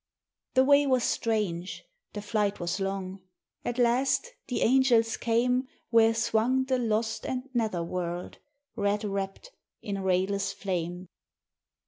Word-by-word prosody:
The 260 - +6
way 285 +1 +5
was 255 -3 +2
strange, 200 -6 -1 0.3
the 205 - -5
flight 205 -1 0
was 175 +3 -2
long; 195 -1 -3 0.4
at 240 - -3
last 255 - +2
the 250 - -1
angels 235 -2 +4
came 250 +3 +1 0.2
Where 225 -1 +5
swung 230 +3 +2
the 260 -1 0
lost 225 -1 -1
and 255 +1 -3
nether 220 -8 0
world, 175 0 -4 0.4
red 205 +1 0
wrapped 195 - -4 0.3
in 200 -1 -3
rayless 195 +1 0
flame. 180 -2 -4
220 Hz, 125 wpm, -28 LUFS, 195-245 Hz, 0.4 s, The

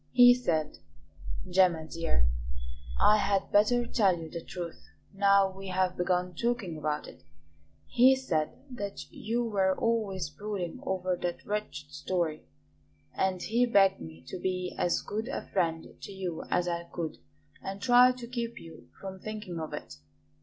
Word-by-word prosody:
He 245 -1 +9
said 160 -11 -1 0.7
Gemma, 180 -3 +3
dear, 160 - 0 0.7
I 210 - +6
had 200 -2 +1
better 240 +4 +4
tell 195 -7 +3
you 160 -1 -8
the 170 -1 -5
truth, 175 -2 -7 0.3
now 200 0 +4
we 195 0 -8
have 185 0 +1
begun 180 0 0
talking 230 -3 -1
about 150 -1 -2
it - - -13 0.6
he 255 +2 +6
said 160 -13 0 0.2
that 205 -5 -6
you 235 +2 -1
were 190 -4 +1
always 210 -7 0
brooding 185 +1 -4
over 185 -1 -1
that 175 0 -4
wretched 205 -9 -4
story, 155 - -2 0.7
and 185 -1 0
he 240 +3 +2
begged 195 -4 +4
me 80 0 -10
to 185 - -6
be 185 0 -2
as 175 - +1
good 220 +3 -3
a 275 - -4
friend 165 -4 0
to - - -7
you 185 -4 -4
as 180 0 +1
I 170 0 -2
could 170 -2 -5 0.4
and 195 +1 -5
try 245 +3 +7
to 250 -1 -7
keep 235 -1 -4
you 165 -1 -13
from 190 -1 -7
thinking 210 -5 -5
of 155 -1 -5
it. 90 - -7
190 Hz, 155 wpm, -30 LUFS, 170-215 Hz, 0.7 s, He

